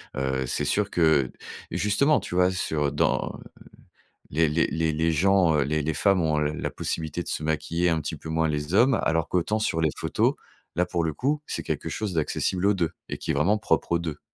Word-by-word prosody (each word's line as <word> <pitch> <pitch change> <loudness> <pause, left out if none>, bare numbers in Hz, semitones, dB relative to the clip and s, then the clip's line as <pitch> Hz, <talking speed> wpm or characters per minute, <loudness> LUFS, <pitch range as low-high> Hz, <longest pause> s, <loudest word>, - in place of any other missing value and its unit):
Heu, 65 -1 -1
c'est 75 - -1
sûr 100 +7 +1
que 80 -6 +3 0.4
justement, 140 +9 +2
tu 90 - -6
vois, 90 +1 +4
sur 75 -6 -1
dans - - 0 1.0
les 80 +1 +2
les 80 +2 +2
les 80 -1 -1
les 80 +2 +1
gens, 90 0 +3
heu, 70 - +2
les 75 +2 0
les 80 +1 -1
femmes 100 -2 +3
ont, 80 -2 +1
heu, 75 0 0
la - - -3
possibilité 80 +2 -3
de - - -9
se - - -2
maquiller, 80 +3 0
un 80 -2 +1
petit - - -4
peu 80 - -10
moins 80 0 +1
les 75 +3 -2
hommes, 130 +4 +5
alors 80 0 +1
qu'autant 105 +5 0
sur 80 -6 0
les 80 -2 +2
photos, - - +1 0.4
là, 90 +2 +2
pour 85 -1 -2
le 80 - -2
coup, 145 - 0
c'est - - -3
quelque - - -3
chose 105 -4 -3
d'accessible 90 +4 0
aux 105 - +4
2 85 -4 0 0.2
et - - -4
qui - - -5
est - - +2
vraiment 90 +9 +2
propre 105 - 0
aux 85 - +3
2. 80 -3 -5
80 Hz, 220 wpm, -25 LUFS, 75-95 Hz, 1.0 s, hommes